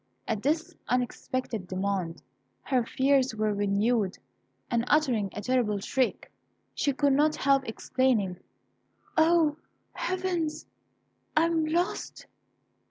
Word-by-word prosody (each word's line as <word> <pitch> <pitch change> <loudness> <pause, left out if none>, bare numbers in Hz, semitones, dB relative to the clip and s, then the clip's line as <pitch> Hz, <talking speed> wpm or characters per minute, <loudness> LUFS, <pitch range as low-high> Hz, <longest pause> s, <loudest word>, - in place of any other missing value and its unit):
At 220 -2 -1
this 310 +5 0 0.2
unexpected 250 -4 -2
demand, 185 -4 -2 0.4
her 255 -3 +1
fears 265 0 +2
were 215 -1 0
renewed, 205 +1 +1 0.5
and 235 -1 +2
uttering 250 -10 +2
a 210 - -5
terrible 240 -4 +1
shriek, 250 +5 -1 0.4
she 285 - +1
could 280 0 +2
not 300 +2 +3
help 275 -1 +2
exclaiming, 225 -5 0 0.8
"O! 320 -2 +4 0.4
Heavens, 360 -4 -2 0.7
I 320 - +6
am 325 -2 +1
lost!" 345 +5 -2
255 Hz, 105 wpm, -28 LUFS, 210-305 Hz, 0.8 s, I